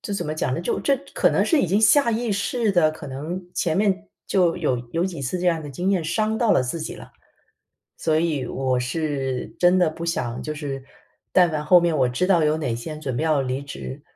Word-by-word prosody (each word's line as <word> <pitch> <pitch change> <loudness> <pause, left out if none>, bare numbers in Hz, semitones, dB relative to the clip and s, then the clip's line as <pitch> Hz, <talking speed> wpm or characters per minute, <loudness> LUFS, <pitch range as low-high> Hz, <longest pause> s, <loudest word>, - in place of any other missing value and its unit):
这 205 - -4
怎 - - -3
么 150 - -3
讲 130 -4 -1
呢？ 165 - -3
就 - - -1
这 275 - +2 0.2
可 - - +4
能 - - +2
是 325 - +3
已 - - +1
经 200 +5 +2
下 235 +1 +5
意 230 0 -1
识 215 +3 0
的， 165 -5 +3
可 150 -2 -9
能 155 +8 -5
前 160 -3 0
面 200 0 +1 0.2
就 180 -4 +2
有 125 - 0
有 170 +2 +1
几 175 -6 -4
次 135 +7 -2
这 180 - -1
样 165 -2 +1
的 145 - -7
经 175 +8 -1
验 180 -5 +1
伤 215 +7 0
到 235 -3 +3
了 - - +3
自 130 +7 -3
己 - - -5
了。 - - -12 0.9
所 160 -1 +1
以 155 -5 -1
我 130 -1 -1
是 135 -1 -2
真 180 +1 +4
的 170 - +3
不 170 +2 -7
想 120 -7 -2
就 155 0 -4
是 140 -3 -5 0.5
但 180 -2 +5
凡 150 -1 -3
后 175 +3 +6
面 170 -2 +1
我 130 - +3
知 125 +9 0
道 175 -4 +4
有 150 +1 +2
哪 130 -7 -2
些 135 +7 -6
人 155 - -8
准 130 -5 -3
备 - - -1
要 150 -4 +2
离 130 +2 -3
职， 140 0 -8
160 Hz, 265 characters per minute, -23 LUFS, 140-185 Hz, 0.9 s, 后